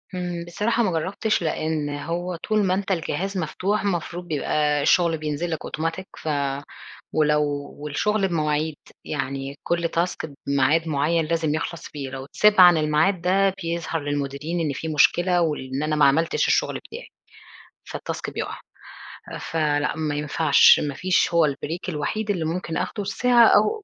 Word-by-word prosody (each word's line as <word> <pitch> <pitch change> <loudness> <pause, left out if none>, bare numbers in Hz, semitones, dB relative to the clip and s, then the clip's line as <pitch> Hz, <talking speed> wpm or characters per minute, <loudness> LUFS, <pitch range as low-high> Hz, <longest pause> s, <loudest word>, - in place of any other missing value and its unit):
إمم، 175 -1 -4
بصراحة 215 +7 0
ما 190 - +1
جربتِش 190 +6 -1
لأن 155 -2 -1
هو 170 +5 -3
طول 215 +5 0
ما 185 - +2
أنت 195 +1 -2
الجهاز 190 +2 -2
مفتوح، 190 +5 -1
المفروض 175 -2 -3
بيبقى 150 -1 0
الشغل 170 +1 +3
بينزل 155 +2 -3
لك 160 - -3
أوتوماتيك، 165 +4 -3
ف - - -9 0.9
ولو 150 -1 +3 0.4
والشغل 195 +8 0
بمواعيد، 155 -2 -1 0.3
يعني 135 -1 -4
كل 170 -1 0
task 170 -1 -2 0.2
بميعاد 140 +4 +2
مُعيّن 155 +3 +1
لازم 160 -1 0
يخلص 165 0 -4
فيه، 140 -3 -6
لو 135 0 -7
اتساب 210 +8 +3
عن 175 -2 +8
الميعاد 155 +4 +2
ده 195 +1 +2
بيظهر 165 -1 -2
للمديرين 145 +3 -3
إن 155 -3 0
في 160 +4 -5
مشكلة 175 +3 +3
وال 150 -5 -2
إن 140 - -1
أنا 155 0 0
ما 150 - +4
عملتش 160 +4 +2
الشغل - - +1
بتاعي، - - -9 0.8
فالtask - - -5
بيقع. - - -4 0.8
فلأ، 150 -2 0
ما 155 -2 -2
ينفعش، 150 0 +5
ما 145 -2 -3
فيش 180 +2 +1
هو 170 - +5
البريك 155 +5 -3
الوحيد 195 +7 -2
اللي 175 -5 -1
ممكن 165 0 -3
آخده 205 - -2
الساعة 235 +4 +4
أو 425 - +3
165 Hz, 155 wpm, -23 LUFS, 150-180 Hz, 0.9 s, عن